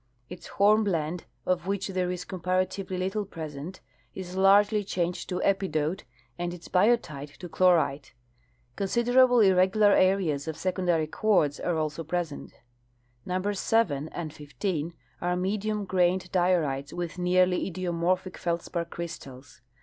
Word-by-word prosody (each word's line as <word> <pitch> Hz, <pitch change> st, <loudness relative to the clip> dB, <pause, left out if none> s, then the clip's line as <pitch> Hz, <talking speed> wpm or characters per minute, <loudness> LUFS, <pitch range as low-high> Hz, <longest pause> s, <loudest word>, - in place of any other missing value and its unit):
Its 180 Hz, -1 st, -9 dB
hornblende, 195 Hz, -6 st, +2 dB, 0.2 s
of 180 Hz, -1 st, 0 dB
which 195 Hz, 0 st, -1 dB
tliere 185 Hz, -2 st, -1 dB
is 180 Hz, -1 st, -5 dB
comparatively 185 Hz, +1 st, -2 dB
little 190 Hz, +3 st, -1 dB
present, 160 Hz, -2 st, -8 dB, 0.3 s
is 185 Hz, -1 st, -7 dB
largel}^ 205 Hz, +2 st, +4 dB
changed 180 Hz, -2 st, -2 dB
to 180 Hz, -, -2 dB
epidote 190 Hz, -3 st, 0 dB, 0.3 s
and 175 Hz, 0 st, -3 dB
its 170 Hz, -, -12 dB
biotite 180 Hz, -9 st, +1 dB
to 180 Hz, -, -8 dB
chlorite. 165 Hz, -7 st, +2 dB, 0.6 s
Considerable 245 Hz, +4 st, +4 dB
irregular 190 Hz, +2 st, +4 dB
areas 180 Hz, -7 st, +2 dB
of 160 Hz, -, -4 dB
secondary 180 Hz, -4 st, 0 dB
quartz 155 Hz, -4 st, +1 dB
are 175 Hz, -2 st, -1 dB
also 155 Hz, +1 st, -2 dB
present. 165 Hz, -2 st, -4 dB, 0.8 s
Numbers 185 Hz, +2 st, -1 dB
7 160 Hz, -10 st, +1 dB
and 160 Hz, -3 st, -6 dB
15 160 Hz, +2 st, -4 dB, 0.3 s
are 180 Hz, 0 st, 0 dB
medium 205 Hz, +3 st, -1 dB
grained 180 Hz, 0 st, +1 dB
diorites 165 Hz, -7 st, +1 dB
with 175 Hz, 0 st, -5 dB
nearly 180 Hz, +1 st, +2 dB
idiomorphic 180 Hz, +1 st, -1 dB
feldspar 170 Hz, 0 st, -2 dB
crystals. 145 Hz, -7 st, -9 dB
180 Hz, 125 wpm, -27 LUFS, 165-195 Hz, 0.8 s, largel}^